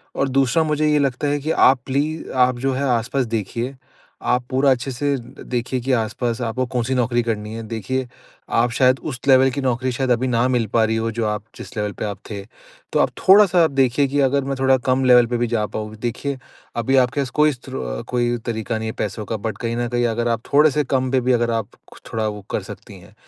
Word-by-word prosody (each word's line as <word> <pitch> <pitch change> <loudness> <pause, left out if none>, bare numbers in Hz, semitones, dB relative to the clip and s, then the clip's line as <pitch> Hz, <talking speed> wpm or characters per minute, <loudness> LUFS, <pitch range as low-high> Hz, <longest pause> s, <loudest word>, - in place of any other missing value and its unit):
और 140 - 0
दूसरा 135 +4 +2
मुझे 155 0 +1
ये 150 - +3
लगता 140 +1 0
है 145 0 0
कि 155 +3 -2
आप 130 -4 +5
प्ली 150 +4 -1
आप 125 -1 +3
जो 135 +2 0
है 135 +2 -2
आस-पास 125 +3 -1
देखिए, 115 +5 -3 0.5
आप 125 0 +1
पूरा 135 +1 +3
अच्छे 130 +1 -1
से 140 +3 -1
द 125 +2 -12
देखिए 125 +1 -1
कि 130 +3 -2
आस-पास 115 +1 -1
आपको 120 +2 -1
कौन-सी 125 +2 0
नौकरी 120 -1 +1
करनी 110 -2 -3
है, 115 - -6
देखिए 120 +4 -3 0.5
आप 120 +1 +3
शायद 130 +2 +3
उस 130 -4 -6
लेवल 135 -1 +6
की 140 - -3
नौकरी 130 0 0
शायद 130 +1 -1
अभी 120 +2 +2
ना 120 0 +2
मिल 125 -3 +1
पा 115 - +4
रही 110 +1 0
हो, 115 0 -1
जो 115 0 -2
आप 105 -1 -2
जिस - - -10
लेवल 105 -1 -1
पे - - -2
आप 100 -2 -4
थे। 100 -2 -5 0.5
तो - - +2
आप - - +3
थोड़ा-सा 190 -3 +6
आप 160 - +2
देखिए 135 +1 +2
कि 140 +2 -1
अगर 140 0 +2
मैं 135 0 -2
थोड़ा 135 0 +4
कम 130 +1 +2
लेवल 125 -1 +7
पे 120 +1 -1
भी 120 0 0
जा 110 -2 0
पाऊँ। 110 0 -6
देखिए 130 +3 -3 0.4
अभी 120 +3 +1
आपके 125 +2 +2
पास 135 - -3
कोई 150 +3 +3
स्रो 90 - -6
कोई 120 -1 0
तरीका 110 -1 -2
नहीं 110 - -4
है - - -5
पैसों 105 +1 -3
का 110 - -3
बट 110 +1 -4
कहीं 115 -1 -2
न 120 0 -1
कहीं 120 0 0
अगर 120 +1 -1
आप 115 0 0
थोड़े 150 +2 +6
से 150 +2 +1
कम 130 -1 0
पे 130 -1 +2
भी 125 +1 +1
अगर 120 -1 +1
आप 115 -3 -2 0.4
थोड़ा 110 -1 0
वो 105 -1 -5
कर - - -1
सकती - - -11
हैं, - - -17
125 Hz, 240 wpm, -21 LUFS, 115-135 Hz, 0.5 s, लेवल